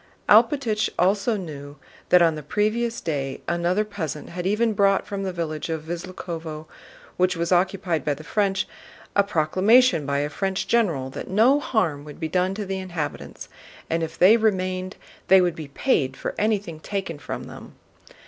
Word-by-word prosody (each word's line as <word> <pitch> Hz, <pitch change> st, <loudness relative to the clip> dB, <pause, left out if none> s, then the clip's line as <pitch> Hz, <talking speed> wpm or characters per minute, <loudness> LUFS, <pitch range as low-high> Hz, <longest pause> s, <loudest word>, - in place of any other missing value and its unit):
Alpátych 235 Hz, -8 st, +4 dB
also 200 Hz, +5 st, +2 dB
knew 145 Hz, -6 st, -8 dB, 0.3 s
that 180 Hz, -1 st, +6 dB
on 165 Hz, -1 st, +4 dB
the 155 Hz, -, -6 dB
previous 215 Hz, +9 st, -1 dB
day 140 Hz, -5 st, -3 dB
another 175 Hz, +4 st, +1 dB
peasant 165 Hz, -8 st, -5 dB
had 180 Hz, +1 st, -4 dB
even 220 Hz, +3 st, +2 dB
brought 195 Hz, -1 st, +3 dB
from 200 Hz, -1 st, -4 dB
the 190 Hz, -1 st, -2 dB
village 165 Hz, -3 st, -4 dB
of 160 Hz, -1 st, -3 dB
Visloúkhovo, 165 Hz, -2 st, -6 dB, 0.5 s
which 180 Hz, -1 st, +2 dB
was 170 Hz, +1 st, -2 dB
occupied 180 Hz, -3 st, +1 dB
by 145 Hz, -, 0 dB
the 155 Hz, -, -11 dB
French, 195 Hz, +2 st, 0 dB, 0.5 s
a 200 Hz, -, +6 dB
proclamation 190 Hz, -, +3 dB
by 140 Hz, 0 st, 0 dB
a 145 Hz, +1 st, -1 dB
French 190 Hz, +2 st, -2 dB
general 165 Hz, -, +1 dB
that -, -, -7 dB
no 230 Hz, +9 st, +4 dB
harm 175 Hz, -, 0 dB
would 150 Hz, -1 st, -11 dB
be 160 Hz, -, -2 dB
done 185 Hz, +3 st, 0 dB
to 210 Hz, 0 st, -4 dB
the 190 Hz, 0 st, -3 dB
inhabitants, 175 Hz, -5 st, -5 dB, 0.4 s
and 165 Hz, 0 st, +1 dB
if 160 Hz, -1 st, -4 dB
they 200 Hz, +6 st, +7 dB
remained 185 Hz, -4 st, -1 dB, 0.3 s
they 190 Hz, -, +7 dB
would 180 Hz, -2 st, +1 dB
be 155 Hz, -2 st, -7 dB
paid 135 Hz, -, 0 dB
for -, -, -4 dB
anything 205 Hz, -7 st, -1 dB
taken 190 Hz, -3 st, -4 dB
from -, -, -6 dB
them. -, -, -11 dB
185 Hz, 170 wpm, -24 LUFS, 160-200 Hz, 0.5 s, they